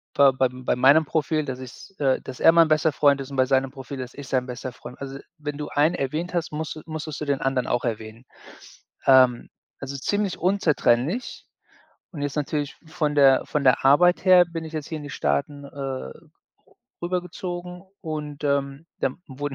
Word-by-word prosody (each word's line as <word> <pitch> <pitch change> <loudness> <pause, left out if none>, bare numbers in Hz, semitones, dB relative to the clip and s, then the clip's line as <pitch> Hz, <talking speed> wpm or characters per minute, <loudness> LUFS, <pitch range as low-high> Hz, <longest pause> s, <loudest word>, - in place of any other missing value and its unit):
bei 140 -1 +6
bei 130 0 +2
bei 125 0 -2
meinem 140 +6 +5
Profil, 155 0 0
dass 130 -2 -5
ich 130 +9 -11
äh, 135 -3 +2
dass 130 - -9
er 165 - +8
mein 165 -1 +6
bester 155 +1 +3
Freund 140 -1 +3
ist, 135 +1 -8
und 135 - -6
bei 130 - +4
seinem 135 0 +1
Profil, 135 0 -8
dass 125 -1 -7
ich 140 -1 -9
sein 130 -2 0
bester 125 +1 -6
Freund 125 - -11
also, 135 0 -6 0.2
wenn 145 -1 -5
du 150 0 -5
einen 150 +4 +2
erwähnt 155 +7 -3
hast, 170 -2 -2
musst 155 +1 -4
du - - -8
musstest 155 -2 -6
du - - -2
den 140 -2 0
anderen 135 -2 0
auch 120 0 0
erwähnen. 110 +1 -5 0.8
Ähm, 130 -2 +5 0.3
also, 140 0 -6
ziemlich 205 +7 -1
unzertrennlich 175 - +1 0.7
und 155 - -7
jetzt 145 0 -3
natürlich 145 -1 -2
von 150 -1 -1
der 135 -2 +5
von 150 -1 -1
der 130 0 +4
Arbeit 175 +8 +5
her 185 -2 +7
bin 165 -1 -6
ich 160 - -9
jetzt 155 -2 -4
hier 160 -2 -4
in 150 - -9
die 145 - -7
Staaten, 135 - -2
äh, - - -9
rü 135 - -6 0.7
rübergezogen 180 0 -4 0.2
und, 150 -2 -5
ähm, 140 +1 -1
dann 130 - -1
wurden 140 +1 -5
145 Hz, 195 wpm, -24 LUFS, 130-160 Hz, 0.8 s, er